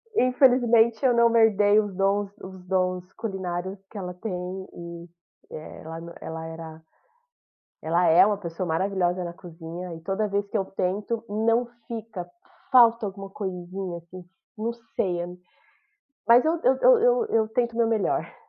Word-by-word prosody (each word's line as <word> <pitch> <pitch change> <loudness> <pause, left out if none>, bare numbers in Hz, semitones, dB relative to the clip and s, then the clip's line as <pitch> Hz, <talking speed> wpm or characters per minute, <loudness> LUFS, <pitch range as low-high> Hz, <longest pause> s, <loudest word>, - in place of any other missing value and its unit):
infelizmente 245 - +4
eu 250 - +5
não 235 0 +4
herdei 210 -2 +5
os 205 -2 -2
dons 195 +1 +1
os 190 -1 -10
dons 185 -1 0
culinários 190 -2 -4
que 210 - -10
ela 180 -2 -5
tem 185 -1 -5
e 170 0 -9 0.4
ela 160 +1 -8
nã 170 0 -9
ela 160 0 -6
era 160 -1 -9 1.0
ela 170 +3 +2
é 165 +4 +7
uma 205 -1 +1
pessoa 175 -1 -5
maravilhosa 180 +1 0
na 170 0 -5
cozinha, 170 +1 -8
e 165 - -11
toda 195 +4 -1
vez 200 0 -1
que 215 - -2
eu 195 - -1
tento, 205 +5 -2
não 225 +3 +1 0.2
fica, 220 -6 -6 0.4
falta 235 -3 +6
alguma 195 0 -6
coisinha, 185 -2 -5
assim, 175 +2 -12 0.3
não 230 +2 -2 0.2
sei, 175 -3 0
a - - -5 1.0
mas 235 +2 +7
eu 325 +1 +1
eu 355 - +5
eu 485 0 +3
eu 220 - +1
tento 235 0 -1
o - - -8
meu 230 -1 +3
melhor. 220 -3 0
195 Hz, 155 wpm, -25 LUFS, 175-225 Hz, 1.0 s, é